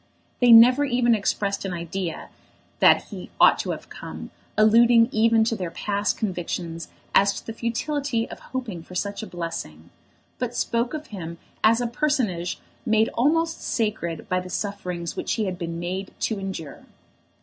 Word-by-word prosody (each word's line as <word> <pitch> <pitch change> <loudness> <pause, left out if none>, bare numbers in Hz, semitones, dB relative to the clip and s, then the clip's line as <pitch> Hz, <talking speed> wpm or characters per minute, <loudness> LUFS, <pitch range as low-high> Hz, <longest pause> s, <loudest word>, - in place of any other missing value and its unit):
They 245 -1 +5
never 245 +5 +8
even 245 -3 +2
expressed 200 -1 -1
an 190 -2 -3
idea 170 0 -4 0.5
that - - +5
he - - -8
ought - - +6
to - - -3
have - - -4
come, - - -8 0.3
alluding 230 +2 +6
even 225 0 +4
to 225 +1 0
their 180 -5 -4
past 205 +4 -1
convictions 175 -4 -4 0.3
as 200 0 +5
to - - -8
the 225 - -5
futility 235 +1 -2
of - - -10
hoping 235 -10 -5
for 180 +2 -13
such 200 +3 -2
a 220 - -6
blessing; 165 - -6 0.5
but 245 -1 -3
spoke 235 +5 0
of 305 0 -7
him 170 -3 -6 0.3
as 225 +2 +5
a - - 0
personage 235 - -1 0.2
made 220 -2 +3
almost 325 +6 +1
sacred 210 -7 -2
by 185 - +1
the 180 0 -8
sufferings 180 -4 -4
which - - -2
he 220 - -1
had 185 -2 -4
been 165 -1 -4
made 185 +3 -4
to 220 -3 -1
endure. 190 -6 -6
210 Hz, 165 wpm, -24 LUFS, 180-235 Hz, 0.5 s, never